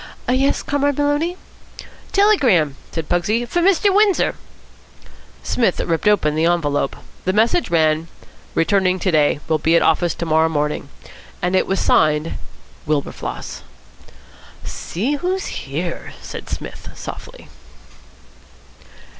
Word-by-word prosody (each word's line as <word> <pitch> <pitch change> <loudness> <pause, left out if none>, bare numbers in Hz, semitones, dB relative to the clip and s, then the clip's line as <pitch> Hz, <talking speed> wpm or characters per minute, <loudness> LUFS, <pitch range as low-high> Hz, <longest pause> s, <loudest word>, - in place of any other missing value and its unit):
"Yes, 270 +2 +1
Comrade 285 -1 0
Maloney?" 290 +5 0 0.7
"Telegram," 255 - +3 0.2
said 165 -2 -4
Pugsy. 210 +7 +1
"For 345 +9 -1
Mr. 390 +2 +3
Windsor." 410 -1 +3 1.1
Psmith 225 -7 +1
ripped 165 +4 -1
open 200 -8 +3
the 160 +2 +1
envelope. 145 -5 0 0.3
The 185 - +1
message 230 - +2
ran: 160 -1 +2 0.5
"Returning 185 +1 +2
to 185 0 0
day. 150 -2 +2
Will 160 -1 +1
be 160 +2 +3
at - - +4
office 165 +1 +2
to 170 - -4
morrow 160 0 +3
morning," 150 -2 -2 0.5
and 180 +1 0
it - - +2
was 195 -1 0
signed 155 +1 +2 0.5
"Wilberfloss." 150 -2 -3 1.0
"See 250 - -3
who's 370 +5 -2 0.2
here!" 170 +5 -4
said - - -8
Psmith - - -7
softly. - - -9
180 Hz, 120 wpm, -20 LUFS, -, 1.1 s, at